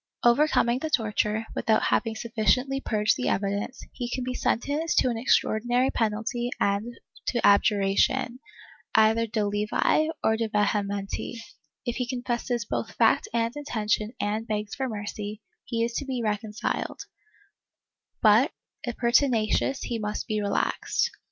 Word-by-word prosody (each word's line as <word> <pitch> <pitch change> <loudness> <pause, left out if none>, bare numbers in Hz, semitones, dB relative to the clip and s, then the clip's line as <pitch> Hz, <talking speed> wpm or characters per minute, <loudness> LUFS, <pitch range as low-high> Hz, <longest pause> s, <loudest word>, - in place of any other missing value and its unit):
Overcoming 240 -1 +4
the 315 - -3
torture, 220 -3 0
without 220 -1 +2
having 225 -2 +1
sufficiently 250 +4 +1
purged 210 -3 +1
the 255 - -2
evidence, 200 +5 -2
he 245 -2 -4
can 255 0 -2
be 250 0 -3
sentenced 290 +7 0
to - - +4
an 235 - -3
extraordinary 245 +2 +2
penalty 225 +2 -1
and 205 +4 0 0.3
to 240 - +1
abjuration, 205 +5 +3 0.6
either 220 +1 +4
de 215 -1 -1
levi 210 +9 +1 0.2
or 220 0 +3
de 225 -1 -1
vehementi: 205 0 -1 0.5
if 240 - -2
he 250 -2 -1
confesses 245 -2 -2
both - - -3
fact - - +3
and 230 +2 0
intention 220 -6 -1
and 215 +2 -1
begs 210 -1 -3
for 265 -2 -2
mercy, 210 0 -5 0.2
he 230 -1 -1
is 235 - -4
to 280 - -2
be 255 -3 -3
reconciled, 210 0 -2 1.2
but 225 - +6 0.3
if 240 -2 -4
pertinacious 240 +1 +2
he 235 -2 -3
must 210 0 -3
be 215 -1 -1
relaxed. 200 -1 0
225 Hz, 140 wpm, -26 LUFS, 210-245 Hz, 1.2 s, but